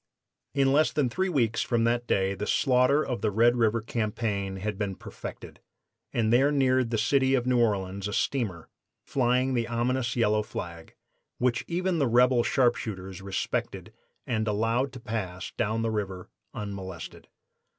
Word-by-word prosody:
"In 135 Hz, -1 st, +3 dB
less 155 Hz, +2 st, +4 dB
than 135 Hz, -5 st, 0 dB
three 190 Hz, +6 st, 0 dB
weeks 120 Hz, -9 st, +1 dB
from 120 Hz, -2 st, +1 dB
that 120 Hz, +1 st, +1 dB
day 95 Hz, 0 st, +1 dB
the 105 Hz, +1 st, -4 dB
slaughter 130 Hz, +2 st, +3 dB
of 125 Hz, -3 st, -3 dB
the 110 Hz, -, +1 dB
Red 115 Hz, +4 st, +4 dB
River 115 Hz, -1 st, +2 dB
campaign 105 Hz, -4 st, -2 dB
had 105 Hz, +2 st, -3 dB
been 100 Hz, -2 st, -2 dB
perfected, -, -, -9 dB, 0.5 s
and 115 Hz, -1 st, +1 dB
there 135 Hz, +4 st, +4 dB
neared 130 Hz, -3 st, +2 dB
the 115 Hz, -, 0 dB
city 130 Hz, +4 st, +3 dB
of 125 Hz, -2 st, 0 dB
New 125 Hz, -1 st, +2 dB
Orleans 100 Hz, -3 st, 0 dB
a 105 Hz, -, -5 dB
steamer 100 Hz, -13 st, -1 dB, 0.4 s
flying 130 Hz, 0 st, +1 dB
the 120 Hz, -2 st, 0 dB
ominous 120 Hz, +1 st, -1 dB
yellow 110 Hz, -3 st, +2 dB
flag, 85 Hz, -5 st, -7 dB, 0.4 s
which 125 Hz, -1 st, +1 dB
even 180 Hz, 0 st, 0 dB
the 140 Hz, -, +2 dB
rebel 125 Hz, +1 st, +4 dB
sharpshooters 105 Hz, -7 st, 0 dB
respected 95 Hz, -1 st, -3 dB, 0.3 s
and 110 Hz, -3 st, -1 dB
allowed 115 Hz, +5 st, +1 dB
to 125 Hz, -, -8 dB
pass 95 Hz, -6 st, -4 dB
down 110 Hz, +2 st, 0 dB
the 115 Hz, -, 0 dB
river 95 Hz, -4 st, -4 dB, 0.2 s
unmolested. 95 Hz, -4 st, -7 dB
115 Hz, 160 wpm, -27 LUFS, 105-125 Hz, 0.5 s, less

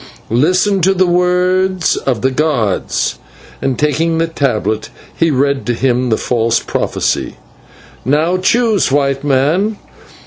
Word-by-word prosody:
Listen 185 Hz, -, +2 dB
to 190 Hz, +3 st, +3 dB
the 185 Hz, 0 st, +3 dB
words 180 Hz, 0 st, +1 dB
of 125 Hz, -4 st, -2 dB
the 130 Hz, -, +2 dB
gods" 130 Hz, -9 st, -1 dB, 0.4 s
and, 135 Hz, -3 st, -1 dB
taking 160 Hz, +4 st, 0 dB
the 165 Hz, -, +2 dB
tablet, 110 Hz, -9 st, -2 dB, 0.3 s
he 165 Hz, -, +1 dB
read 140 Hz, -1 st, 0 dB
to 120 Hz, -, 0 dB
him 125 Hz, 0 st, 0 dB
the 110 Hz, -, +2 dB
false 115 Hz, -1 st, 0 dB
prophecy. -, -, -2 dB, 0.7 s
"Now 155 Hz, +7 st, +1 dB
choose, 220 Hz, -, +1 dB
White 140 Hz, -1 st, 0 dB
Man. 150 Hz, +10 st, +1 dB
150 Hz, 130 wpm, -15 LUFS, 130-180 Hz, 0.7 s, to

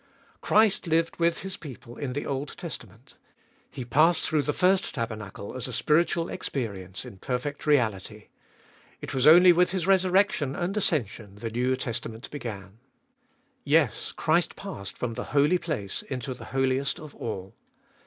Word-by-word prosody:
Christ 215 Hz, -4 st, +3 dB
lived 165 Hz, +1 st, +1 dB
with 170 Hz, 0 st, +1 dB
His 190 Hz, 0 st, -5 dB
people 125 Hz, -5 st, -10 dB
in 135 Hz, -3 st, -4 dB
the 145 Hz, -, -3 dB
Old 140 Hz, +1 st, -4 dB
Testament; 120 Hz, -, -9 dB, 0.5 s
He 130 Hz, -3 st, -7 dB
passed 155 Hz, +8 st, +3 dB
through 155 Hz, -2 st, +2 dB
the 145 Hz, +1 st, -1 dB
first 185 Hz, +4 st, +2 dB
tabernacle 110 Hz, -4 st, -5 dB
as 130 Hz, -, -3 dB
a -, -, -6 dB
spiritual 165 Hz, +6 st, +2 dB
experience 100 Hz, -8 st, -4 dB
in 95 Hz, -, -11 dB
perfect 140 Hz, +6 st, -3 dB
reality; 110 Hz, -6 st, 0 dB, 0.7 s
it -, -, -7 dB
was 130 Hz, +1 st, +2 dB
only 175 Hz, +3 st, +9 dB
with 180 Hz, +1 st, +3 dB
His 185 Hz, -3 st, -2 dB
resurrection 185 Hz, -6 st, +3 dB
and 180 Hz, +3 st, -2 dB
ascension 110 Hz, -, -1 dB
the 110 Hz, +2 st, -5 dB
New 125 Hz, +3 st, +1 dB
Testament 115 Hz, -2 st, -4 dB
began. 105 Hz, -7 st, -7 dB, 0.8 s
Yes, 150 Hz, -, +2 dB
Christ 165 Hz, +1 st, +1 dB
passed 185 Hz, -, -7 dB
from 125 Hz, -2 st, -3 dB
the -, -, -5 dB
Holy 150 Hz, +6 st, +4 dB
Place 135 Hz, -, -3 dB
into 130 Hz, -2 st, -5 dB
the 125 Hz, -, -11 dB
Holiest 135 Hz, +1 st, 0 dB
of 155 Hz, -2 st, -10 dB
All. 95 Hz, -4 st, -6 dB
135 Hz, 155 wpm, -27 LUFS, 115-165 Hz, 0.8 s, only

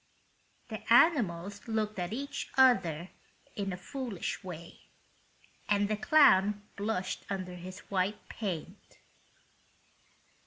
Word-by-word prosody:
The -, -, -7 dB
animals 205 Hz, -, +3 dB
looked 215 Hz, -2 st, -1 dB
at 175 Hz, 0 st, -3 dB
each 280 Hz, +4 st, -4 dB
other 180 Hz, -, +4 dB, 0.4 s
in 200 Hz, -1 st, -2 dB
a 180 Hz, -, -4 dB
foolish 235 Hz, -2 st, -5 dB
way, 170 Hz, -3 st, -9 dB, 0.8 s
and 205 Hz, 0 st, +3 dB
the 215 Hz, -, 0 dB
clown 210 Hz, -6 st, +5 dB
blushed 200 Hz, -3 st, -2 dB
under 185 Hz, -2 st, -4 dB
his 185 Hz, +3 st, -9 dB
white 195 Hz, +2 st, -1 dB
paint. 190 Hz, -8 st, -6 dB
200 Hz, 105 wpm, -31 LUFS, 180-225 Hz, 0.8 s, clown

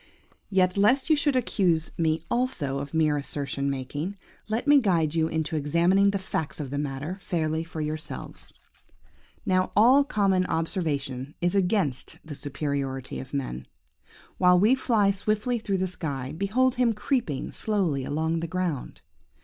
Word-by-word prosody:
"Yet, 185 Hz, -1 st, +2 dB
lest 255 Hz, +9 st, +3 dB
you -, -, +7 dB
should 290 Hz, -2 st, +1 dB
accuse 180 Hz, -9 st, +1 dB
me 160 Hz, 0 st, 0 dB
also 175 Hz, -, 0 dB
of 140 Hz, 0 st, -6 dB
mere 155 Hz, -2 st, +2 dB
assertion 140 Hz, -1 st, -2 dB
making, 145 Hz, +8 st, -4 dB, 0.3 s
let 225 Hz, +4 st, -1 dB
me 290 Hz, -1 st, +7 dB
guide 170 Hz, -, +1 dB
you 160 Hz, -1 st, +2 dB
into 160 Hz, 0 st, -2 dB
examining 170 Hz, +7 st, +3 dB
the 200 Hz, -, 0 dB
facts 160 Hz, -6 st, -4 dB
of 140 Hz, -3 st, -5 dB
the 140 Hz, -, -2 dB
matter 145 Hz, +6 st, -4 dB
fairly 160 Hz, -3 st, -1 dB
for 165 Hz, -1 st, -6 dB
yourselves. 155 Hz, +1 st, -5 dB, 0.9 s
"Now 185 Hz, -2 st, +1 dB
all 250 Hz, +7 st, +6 dB
common 195 Hz, -7 st, +1 dB
observation 150 Hz, -5 st, -2 dB
is 175 Hz, 0 st, +1 dB
against 185 Hz, -, 0 dB
the 160 Hz, -, -7 dB
superiority 140 Hz, -2 st, -3 dB
of 130 Hz, -, -9 dB
man. 95 Hz, -, -4 dB, 0.7 s
While 180 Hz, -1 st, +6 dB
we 215 Hz, +6 st, +5 dB
fly 225 Hz, -6 st, +3 dB
swiftly 215 Hz, +5 st, -1 dB
through 200 Hz, -3 st, -1 dB
the 190 Hz, -, 0 dB
sky, 140 Hz, -8 st, -4 dB
behold 230 Hz, +8 st, +2 dB
him 235 Hz, -2 st, +4 dB
creeping 210 Hz, -, -1 dB
slowly 185 Hz, -11 st, -1 dB
along 160 Hz, +4 st, -1 dB
the 165 Hz, -, -3 dB
ground. 170 Hz, -5 st, -3 dB
170 Hz, 150 wpm, -26 LUFS, 145-200 Hz, 0.9 s, you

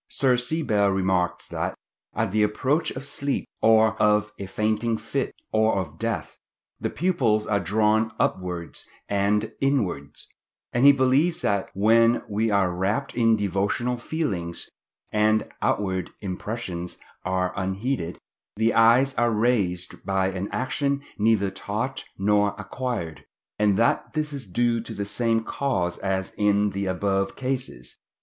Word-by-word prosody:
Sir 130 Hz, -3 st, +3 dB
C. 125 Hz, +7 st, -1 dB
Bell 100 Hz, -5 st, +2 dB
remarks 95 Hz, -2 st, 0 dB
that, -, -, -3 dB, 0.4 s
at 110 Hz, -3 st, 0 dB
the 110 Hz, +1 st, +2 dB
approach 130 Hz, +9 st, +1 dB
of 130 Hz, +2 st, -6 dB
sleep, 140 Hz, -1 st, -2 dB, 0.2 s
or 110 Hz, 0 st, +5 dB
of 105 Hz, 0 st, +3 dB
a 100 Hz, -, -5 dB
fainting 110 Hz, +3 st, 0 dB
fit, -, -, -2 dB, 0.2 s
or 110 Hz, 0 st, +3 dB
of 90 Hz, -7 st, -4 dB
death, -, -, -3 dB, 0.4 s
the -, -, -1 dB
pupils 125 Hz, -12 st, +1 dB
are 100 Hz, -1 st, +1 dB
drawn 110 Hz, +4 st, +2 dB
upwards 90 Hz, -3 st, -2 dB, 0.2 s
and 100 Hz, +1 st, +1 dB
inwards; 105 Hz, -, -1 dB, 0.5 s
and 120 Hz, +3 st, +5 dB
he -, -, +11 dB
believes 140 Hz, +5 st, +2 dB
that 100 Hz, -2 st, 0 dB
"when 115 Hz, +4 st, +4 dB
we 110 Hz, +2 st, 0 dB
are 100 Hz, -3 st, +2 dB
wrapt 100 Hz, +10 st, -1 dB
in 115 Hz, -2 st, +4 dB
devotional 100 Hz, +5 st, 0 dB
feelings, 110 Hz, -, -3 dB, 0.5 s
and 110 Hz, +1 st, +3 dB
outward 95 Hz, -3 st, 0 dB
impressions 95 Hz, -2 st, -5 dB, 0.3 s
are 90 Hz, 0 st, 0 dB
unheeded, 95 Hz, -1 st, -2 dB, 0.4 s
the 110 Hz, +2 st, +2 dB
eyes 120 Hz, +4 st, +5 dB
are 120 Hz, 0 st, +3 dB
raised 105 Hz, -6 st, 0 dB
by 95 Hz, -1 st, +1 dB
an 95 Hz, +1 st, -4 dB
action 140 Hz, +2 st, -1 dB, 0.2 s
neither 105 Hz, -2 st, +3 dB
taught 115 Hz, +9 st, -4 dB
nor 105 Hz, +1 st, +2 dB
acquired." 85 Hz, -, -4 dB, 0.4 s
and 105 Hz, -2 st, +3 dB
that 115 Hz, +1 st, +1 dB
this 155 Hz, -1 st, -2 dB
is 135 Hz, -6 st, -6 dB
due 115 Hz, +4 st, +1 dB
to 110 Hz, 0 st, -8 dB
the 100 Hz, -, -3 dB
same 115 Hz, +1 st, 0 dB
cause 95 Hz, -11 st, -1 dB
as 95 Hz, -1 st, -2 dB
in 105 Hz, 0 st, +3 dB
the 100 Hz, 0 st, -2 dB
above 95 Hz, +1 st, 0 dB
cases. 130 Hz, -, -4 dB
105 Hz, 140 wpm, -25 LUFS, 95-120 Hz, 0.5 s, he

